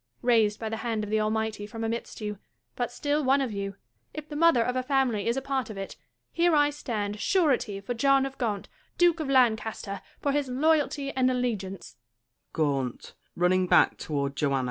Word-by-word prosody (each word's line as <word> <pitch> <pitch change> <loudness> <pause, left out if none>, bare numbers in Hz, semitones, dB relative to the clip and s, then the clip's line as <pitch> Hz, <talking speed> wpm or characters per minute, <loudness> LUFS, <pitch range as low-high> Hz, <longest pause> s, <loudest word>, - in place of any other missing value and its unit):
Raised 225 -4 +3
by 225 - -4
the 220 0 -3
hand 220 -1 -2
of 210 - -5
the 215 - +2
Almighty 215 -1 -1
from 225 +2 -6
amidst 230 0 -4
you, 210 -2 -4 0.4
but 245 -1 -2
still 290 +4 -1
one 270 +1 +4
of 265 -4 -1
you, 200 -1 -4 0.4
if 305 -1 -6
the 300 - -8
mother 320 -6 +4
of 250 +2 -2
a 255 - +1
family 255 -6 0
is 235 +3 +1
a 270 - -2
part 270 -4 -2
of 215 - -7
it, 195 0 -6 0.4
here 340 -1 +3
I 290 0 +4
stand 215 -8 -4
surety 265 - +1
for 220 +5 -3
John 275 +3 +3
of 270 0 -6
Gaunt, 210 -6 -2 0.3
Duke 345 -1 +4
of 305 -3 -3
Lan 250 -4 +5
caster, 210 -3 -6 0.2
for 285 - 0
his 285 -1 0
loyalty 290 0 +1
and 255 -1 +2
allegiance. 205 - -3
245 Hz, 175 wpm, -27 LUFS, 215-275 Hz, 0.4 s, Lan